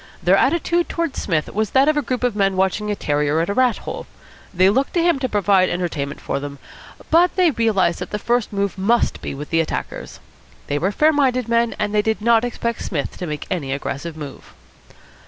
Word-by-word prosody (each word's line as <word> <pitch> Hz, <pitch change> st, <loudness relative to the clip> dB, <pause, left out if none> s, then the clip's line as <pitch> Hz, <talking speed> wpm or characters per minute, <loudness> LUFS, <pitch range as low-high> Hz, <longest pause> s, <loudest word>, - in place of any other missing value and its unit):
Their 180 Hz, +2 st, +5 dB
attitude 340 Hz, -, +1 dB
towards 335 Hz, -4 st, -2 dB
Psmith 160 Hz, -5 st, -1 dB
was 215 Hz, 0 st, 0 dB
that 270 Hz, +2 st, +4 dB
of 310 Hz, -, +3 dB
a 295 Hz, -, +2 dB
group 255 Hz, -1 st, -3 dB
of 245 Hz, -4 st, +1 dB
men 195 Hz, -2 st, +1 dB
watching 190 Hz, +3 st, 0 dB
a 205 Hz, -, 0 dB
terrier 150 Hz, -2 st, 0 dB
at 165 Hz, -, -1 dB
a -, -, 0 dB
rat 250 Hz, 0 st, +2 dB
hole. -, -, -7 dB, 0.4 s
They 185 Hz, 0 st, +4 dB
looked 260 Hz, -, +1 dB
to 340 Hz, -, +3 dB
him 340 Hz, -5 st, +2 dB
to 260 Hz, -1 st, -2 dB
provide 200 Hz, -3 st, +3 dB
entertainment 155 Hz, -6 st, -3 dB
for -, -, -3 dB
them, 140 Hz, 0 st, -7 dB, 0.5 s
but 345 Hz, +3 st, +4 dB
they 365 Hz, -3 st, +4 dB
realised 215 Hz, -8 st, +1 dB
that -, -, -5 dB
the 210 Hz, -, -2 dB
first 240 Hz, +2 st, 0 dB
move 200 Hz, -1 st, -2 dB
must 230 Hz, +5 st, +1 dB
be -, -, -5 dB
with 145 Hz, +2 st, -8 dB
the 165 Hz, 0 st, +3 dB
attackers. 160 Hz, -, -5 dB, 0.5 s
They 145 Hz, -, -1 dB
were 190 Hz, +5 st, 0 dB
fair 305 Hz, +8 st, +3 dB
minded 255 Hz, -4 st, +1 dB
men, 235 Hz, 0 st, +1 dB
and 210 Hz, 0 st, -2 dB
they 210 Hz, -, +3 dB
did 220 Hz, +1 st, -1 dB
not 230 Hz, +1 st, +3 dB
expect 235 Hz, -1 st, -3 dB
Psmith 150 Hz, -6 st, -3 dB
to 180 Hz, -, -4 dB
make 150 Hz, -1 st, -5 dB
any 145 Hz, -7 st, -2 dB
aggressive 145 Hz, +3 st, -5 dB
move. 145 Hz, -3 st, -10 dB
210 Hz, 215 wpm, -20 LUFS, 170-250 Hz, 0.5 s, Their